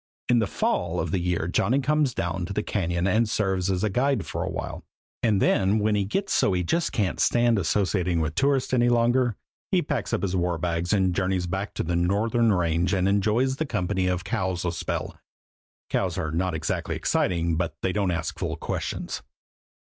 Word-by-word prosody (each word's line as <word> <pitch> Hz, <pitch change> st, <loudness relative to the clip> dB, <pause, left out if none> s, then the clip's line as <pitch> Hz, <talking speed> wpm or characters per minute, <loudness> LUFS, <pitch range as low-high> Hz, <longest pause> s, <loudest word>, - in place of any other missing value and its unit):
In 120 Hz, -1 st, +5 dB
the 110 Hz, -, +1 dB
fall 90 Hz, -2 st, -1 dB
of 80 Hz, 0 st, -2 dB
the 95 Hz, -, +1 dB
year 85 Hz, -1 st, -1 dB
Johnny 100 Hz, +8 st, +2 dB
comes 145 Hz, -2 st, +1 dB
down 90 Hz, -1 st, -2 dB
to 100 Hz, -, -5 dB
the 105 Hz, -, -1 dB
Cañon 85 Hz, -2 st, -1 dB
and 110 Hz, +3 st, +2 dB
serves 95 Hz, -4 st, 0 dB
as 95 Hz, 0 st, 0 dB
a 110 Hz, -, +2 dB
guide 130 Hz, -1 st, +1 dB
a -, -, -2 dB
while; -, -, -5 dB, 0.4 s
and 110 Hz, -4 st, +2 dB
then, 95 Hz, +2 st, +3 dB
when 105 Hz, 0 st, +1 dB
he 100 Hz, -1 st, +1 dB
gets 195 Hz, -, -1 dB
so 100 Hz, -, +3 dB
he 90 Hz, -1 st, 0 dB
just 170 Hz, -, 0 dB
can't 100 Hz, -5 st, -1 dB
stand 120 Hz, -2 st, +3 dB
associating 95 Hz, -3 st, +1 dB
with 80 Hz, -2 st, -1 dB
tourists 135 Hz, -, +1 dB
any 120 Hz, -1 st, +4 dB
longer, 120 Hz, 0 st, +2 dB, 0.4 s
he -, -, +3 dB
packs -, -, -2 dB
his 95 Hz, -2 st, -1 dB
war 90 Hz, -1 st, 0 dB
bags 85 Hz, +1 st, -1 dB
and 95 Hz, -3 st, +2 dB
journeys 95 Hz, -1 st, 0 dB
back 95 Hz, +4 st, -4 dB
to -, -, -1 dB
the 85 Hz, +1 st, -1 dB
Northern 110 Hz, +6 st, +2 dB
Range 85 Hz, -2 st, +1 dB
and 95 Hz, 0 st, +1 dB
enjoys 110 Hz, +7 st, +2 dB
the 160 Hz, -, -1 dB
company 95 Hz, -5 st, -1 dB
of 90 Hz, -1 st, -1 dB
cows 90 Hz, -1 st, -2 dB
a 85 Hz, -, +1 dB
spell. 85 Hz, -, -4 dB, 0.7 s
Cows -, -, 0 dB
are 80 Hz, -, -2 dB
not 90 Hz, +1 st, -1 dB
exactly 80 Hz, -, -2 dB
exciting, 85 Hz, -2 st, 0 dB
but 80 Hz, -2 st, -2 dB
they 95 Hz, -, +1 dB
don't 100 Hz, -3 st, +1 dB
ask 80 Hz, -2 st, -3 dB
fool -, -, -2 dB
questions. -, -, -4 dB
95 Hz, 195 wpm, -25 LUFS, 90-110 Hz, 0.7 s, In